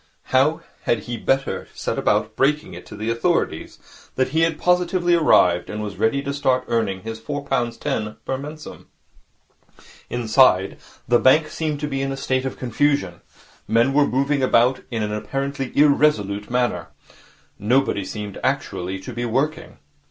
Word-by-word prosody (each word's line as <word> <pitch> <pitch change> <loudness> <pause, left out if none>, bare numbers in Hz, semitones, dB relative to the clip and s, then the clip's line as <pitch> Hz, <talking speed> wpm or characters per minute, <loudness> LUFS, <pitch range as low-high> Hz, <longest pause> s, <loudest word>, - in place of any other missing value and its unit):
How 150 +5 +3 0.2
had 115 -3 +1
he 120 +3 -5
better 135 +4 -1
set - - -3
about - - +1
breaking 145 -7 +1
it 90 - -10
to - - -10
the 110 +2 -2
authorities 115 0 -1 0.4
that 130 0 +1
he 160 +4 0
had 165 -1 +1
positively 180 0 +2
arrived 90 - +4
and 105 0 -4
was 100 -3 -6
ready 115 +7 +1
to 140 - -3
start 130 -2 +1
earning 105 -5 -1
his 110 0 -6
four 145 +4 -5
pound 120 -4 -1
ten 105 0 -3
per 135 - -1
mensem? 150 +3 -9 1.2
Inside, 115 -5 +3 0.3
the 120 0 +4
bank 155 +4 +4
seemed 155 -2 -3
to 150 - -1
be 135 -2 -2
in 135 0 -2
a 135 - -4
state 130 -1 -1
of 130 - -4
some - - -20
confusion. 125 - 0 0.5
Men 115 +4 +3
were 145 0 +4
moving 140 +2 0
about 125 0 +3
in 115 -3 -2
an 105 0 -2
apparently 135 +5 -3
irresolute 140 -9 +3
manner. 120 -9 0 0.7
Nobody 115 -1 +1
seemed 105 +1 -6
actually 90 +2 -2
to 125 - -8
be 120 +1 -3
working. 135 +7 -2
130 Hz, 165 wpm, -22 LUFS, 110-140 Hz, 1.2 s, arrived